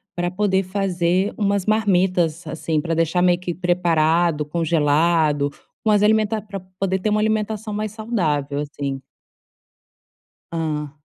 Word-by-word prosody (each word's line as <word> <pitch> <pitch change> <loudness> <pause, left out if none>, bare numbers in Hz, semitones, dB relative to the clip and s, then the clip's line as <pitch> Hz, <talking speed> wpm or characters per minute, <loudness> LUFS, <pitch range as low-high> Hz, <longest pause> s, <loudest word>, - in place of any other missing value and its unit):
pra 175 0 -1
poder 190 0 +1
fazer 185 0 0
umas 200 -2 0
marmitas, 185 -6 +1
assim, 160 0 -2
pra 165 +1 -2
deixar 165 +2 +1
meio 180 -1 +3
que 180 -1 -4
preparado, 170 -3 +1
congelado, 155 -1 +2 0.4
umas 210 -1 +4
alimenta 215 0 +2
pra 200 -2 -7
poder 185 +1 -3
ter 215 - -1
uma 210 0 +1
alimentação 215 0 -1
mais 215 0 -3
saudável, 155 -11 -1
assim. 140 -2 -4 1.5
Hã. 155 -3 -3
180 Hz, 125 wpm, -21 LUFS, 160-205 Hz, 1.5 s, umas